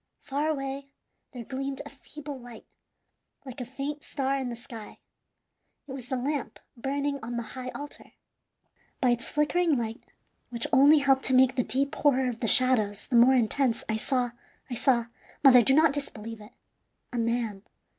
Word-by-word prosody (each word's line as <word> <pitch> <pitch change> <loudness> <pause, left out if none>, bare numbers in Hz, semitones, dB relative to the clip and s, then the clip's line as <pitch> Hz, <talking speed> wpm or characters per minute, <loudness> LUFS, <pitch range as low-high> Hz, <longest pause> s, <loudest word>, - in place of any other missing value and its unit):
Far 290 +2 -1
away 275 -2 -3 0.4
there 245 -3 -7
gleamed 270 +2 -4
a - - -8
feeble 285 +1 -9
light, 240 -2 -12 0.8
like 260 -1 -8
a - - -4
faint 280 +4 -5
star 275 -1 -2
in 265 -2 -2
the 240 - -5
sky; 230 -3 -10 0.9
it - - -9
was 255 -2 -8
the 260 - -1
lamp 275 +1 -3 0.2
burning 280 +3 -2
on 235 +1 -5
the 235 - -2
high 255 -1 -6
altar. 290 0 -9 0.9
By 250 -3 +3
its 240 0 -1
flickering 305 +1 +2
light, 225 -1 -4 0.5
which 235 -1 -1
only 285 +3 +7
helped 270 -2 +3
to 260 - +2
make 260 0 +5
the 250 - +1
deep 270 +4 0
horror 265 -3 +2
of 235 -2 -6
the 235 - -1
shadows 220 -5 +3
the 250 - -2
more 245 +3 +7
intense, 245 +1 +1
I 220 - 0
saw 245 +1 -1 0.4
I - - -1
saw 235 0 +2 0.4
mother, 255 -3 +8
do 265 +3 +3
not 310 -1 +5
disbelieve 225 -6 -6
it 210 +4 -14 0.6
a 240 - -1
man. 230 -3 -1
260 Hz, 175 wpm, -27 LUFS, 235-275 Hz, 0.9 s, mother